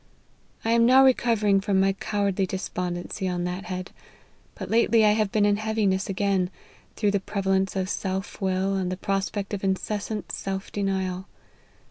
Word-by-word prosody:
I 225 - +2
am 230 0 +5
now 265 +2 +7
recovering 220 -6 +3
from 195 -1 +1
my 195 0 +3
cowardly 200 -1 -1
despondency 180 0 -3
on 175 -1 -1
that 180 +3 -4
head; 185 -1 -5 0.6
but - - -6
lately 230 -1 +4
I 210 - +6
have 210 -2 +1
been 210 -1 +3
in 205 0 +3
heaviness 210 -3 0
again, 195 -2 +1 0.5
through 205 -2 +1
the 200 - +1
preva 195 0 -4
lence 190 0 +1
of 190 -1 -1
self 190 +1 -3
will, 190 +1 0
and 185 -2 -1
the 185 - -3
prospect 195 +1 -2
of 200 - -3
incessant 205 +2 -2
self 195 0 -4
denial. 190 -2 -2
195 Hz, 165 wpm, -25 LUFS, 190-210 Hz, 0.6 s, now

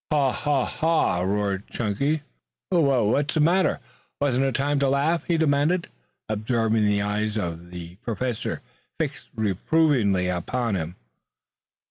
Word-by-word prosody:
"Haw, 140 -4 +3
haw, 145 -2 0
haw!" 160 - +1
roared 100 +1 -1
Chunky. 140 +8 -1 0.5
"Wha 140 -9 +3
what's 140 +9 +1
the - - +2
matter? 175 +5 +3 0.4
Wasn't 135 -2 +2
it 135 -2 0
time 145 +1 +1
to 140 -1 +2
laugh?" 150 +5 +1
he 170 -2 +1
demanded, 155 +3 +2 0.4
observing 110 0 +1
the 100 -1 +2
eyes 105 +1 -1
of 85 -3 -4
the 90 0 -9
Professor 120 0 -3 0.4
fixed - - -3
reprovingly 110 - +2
upon 110 +6 -1
him. 85 -1 -3
120 Hz, 130 wpm, -25 LUFS, 100-145 Hz, 0.5 s, Haw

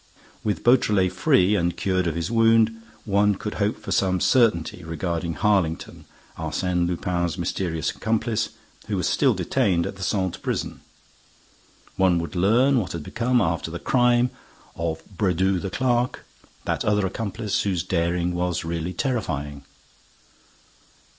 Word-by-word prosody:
With 105 - -2
Beautrelet 105 -7 +3
free 95 +1 +3
and 85 -3 0
cured 95 -2 0
of 80 - -1
his 85 +4 -3
wound, 115 -1 +3 0.2
one 100 0 +3
could 105 +2 -5
hope 105 +2 +1
for - - -8
some 95 -1 +2
certainty 100 -9 +2
regarding 85 0 -3
Harlington, 95 -6 0 0.3
Arsène 85 +2 -1
Lupin's 85 -2 -1
mysterious 80 -4 -2
accomplice, 110 0 -1 0.4
who - - -1
was - - 0
still - - +3
detained 85 -4 +1
at - - -6
the - - -10
Santé 95 -2 -1
prison. - - -3 1.2
One 95 -2 +4
would 85 +2 -4
learn 120 +9 +4
what 95 -5 -4
had 85 -3 -5
become, 120 +5 +1
after 80 -2 -1
the 85 - -5
crime, 120 +3 +2 0.4
of 80 -1 -3
Brédoux 95 -1 +1
the 95 - -3
clerk, 125 +3 0 0.4
that - - -1
other 105 -1 +2
accomplice, 105 +1 -2
whose 90 -4 -1
daring 85 -1 0
was 90 -2 -1
really 85 +1 -3
terrifying. 75 - -3
95 Hz, 140 wpm, -24 LUFS, 85-110 Hz, 1.2 s, One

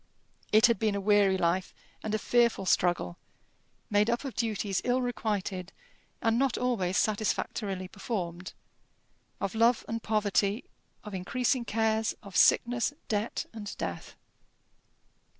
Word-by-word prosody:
It 215 +1 +7
had 235 -5 +3
been 215 -2 +1
a - - -1
weary 200 -1 +4
life 180 +1 0 0.3
and 215 0 -2
a - - +2
fearful 235 -3 +2
struggle, 175 - +1 0.7
made 205 +2 +3
up 240 +4 0
of 270 - -4
duties 210 -4 -1
ill 250 +1 +2
requited 205 -7 -2 0.5
and 225 +1 +2
not 270 -2 +1
always 210 -7 0
satisfactorily 200 -2 -1
performed, 185 -3 -5 0.9
of 195 - -2
love 230 +2 +3
and 230 0 -3
poverty, 210 0 +1 0.4
of 210 - -8
increasing 240 +6 0
cares, 220 0 0
of 200 -2 -11
sickness, 240 +3 +4 0.2
debt, 215 +1 -1
and 210 -2 -7
death. - - -5
215 Hz, 130 wpm, -29 LUFS, 195-230 Hz, 0.9 s, It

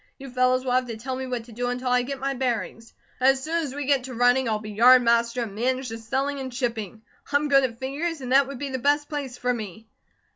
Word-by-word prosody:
You 270 -2 -10
fellows 255 +1 +2
will 255 - -1
have 255 0 +2
to 230 -2 -5
tell 260 +3 -4
me 260 0 -5
what 245 -2 -3
to 235 - -15
do 245 +2 -3
until 250 +1 -2
I 250 0 +3
get 275 +3 -4
my 275 +1 -1
bearings. 235 -3 -3 0.3
As 265 +1 +3
soon 335 +2 0
as 275 -3 -5
we 290 -1 -3
get 270 -2 +2
to 255 -2 -7
running, 245 +1 +3
I'll 215 - +1
be 215 0 -8
yard 245 +4 +6
master, 235 +1 +2
and 215 -4 -7
manage 255 +4 -1
the 225 0 -6
selling 270 +5 -2
and 260 -1 -5
shipping. 230 -4 -4 0.3
I'm 290 +1 +2
good 275 -1 +5
at 235 -3 -2
figures, 290 +6 -3
and 255 -2 -6
that 270 +1 +5
would 275 -1 -7
be 280 +2 -4
the 260 -1 -3
best 290 +3 +2
place 280 -5 -5
for 250 0 0
me." 220 -2 -7
255 Hz, 260 wpm, -25 LUFS, 235-270 Hz, 0.3 s, yard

